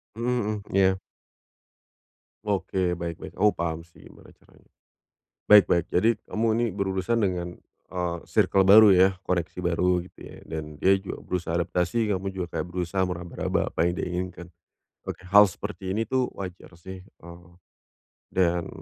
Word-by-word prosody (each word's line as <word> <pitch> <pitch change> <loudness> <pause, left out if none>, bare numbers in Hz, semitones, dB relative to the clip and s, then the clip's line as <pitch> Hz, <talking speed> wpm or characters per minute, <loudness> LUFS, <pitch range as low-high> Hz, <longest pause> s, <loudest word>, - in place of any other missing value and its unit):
Mhm 120 +2 -2
mhm. 105 -1 -3
Iya. 95 -1 +3 1.4
Oke, 95 -3 -1
baik 85 -1 -5
baik. - - -10
Oh 105 +1 +4
paham 80 -1 -4
sih 85 - -20
gimana - - -17
caranya. - - -25 0.8
Baik 105 -4 +7
baik. 85 - +2
Jadi 115 +5 +2
kamu 115 +1 -1
ini 120 - +2
berurusan 100 +3 -1
dengan, 90 -2 -2 0.3
eee, 90 -2 -3
circle 95 -1 +2
baru 105 +1 +9
ya? 95 +1 +5
Koneksi 90 0 -2
baru 90 +1 +1
gitu 90 - -17
ya? - - -12
Dan 75 -1 -8
dia 95 +1 +5
juga 95 - -8
berusaha 85 -2 -3
adaptasi, 90 +6 0
kamu 95 0 -2
juga 90 -2 -4
kayak - - -2
berusaha 90 +1 -1
meraba-raba 85 -1 -3
apa 85 - 0
yang 85 - 0
dia - - -3
inginkan. 90 -1 -5 0.6
Oke, 90 -1 -6
hal 105 +1 +8
seperti 95 0 -6
ini 110 +1 -2
itu 130 -1 +1
wajar 90 -2 -9
sih, 95 +2 -11
eee, 85 -1 -15 0.8
dan 85 -2 0
90 Hz, 155 wpm, -26 LUFS, 85-100 Hz, 1.4 s, baru